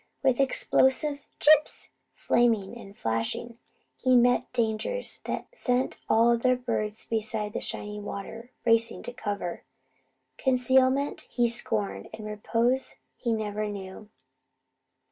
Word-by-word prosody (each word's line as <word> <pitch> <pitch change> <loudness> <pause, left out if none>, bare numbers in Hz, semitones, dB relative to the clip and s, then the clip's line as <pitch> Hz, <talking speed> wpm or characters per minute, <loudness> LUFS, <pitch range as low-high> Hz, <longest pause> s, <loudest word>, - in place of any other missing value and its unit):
With 260 -2 +2
explosive 275 +2 +3 0.2
"chips" 305 0 +4 0.3
flaming 230 -3 +1
and 200 -4 -12
flashing, 115 - -2 0.4
he 255 -1 +2
met 245 0 +3
dangers 235 - +1
that - - -5
sent 250 - 0
all 230 +1 +5
the - - -2
other 255 +1 +3
birds 225 -4 -3
beside 215 -1 -2
the - - -2
shining 210 0 -5
river 225 +4 -7 0.2
racing 230 0 +2
to 245 - -7
cover. 200 -6 -4 0.8
Concealment 260 +2 +2
he 240 -1 +1
scorned; 100 - -1
and 215 -1 -9
repose 230 +5 -1 0.2
he 235 - -2
never 215 -1 -2
knew. 200 +1 -8
230 Hz, 120 wpm, -27 LUFS, 210-255 Hz, 0.8 s, all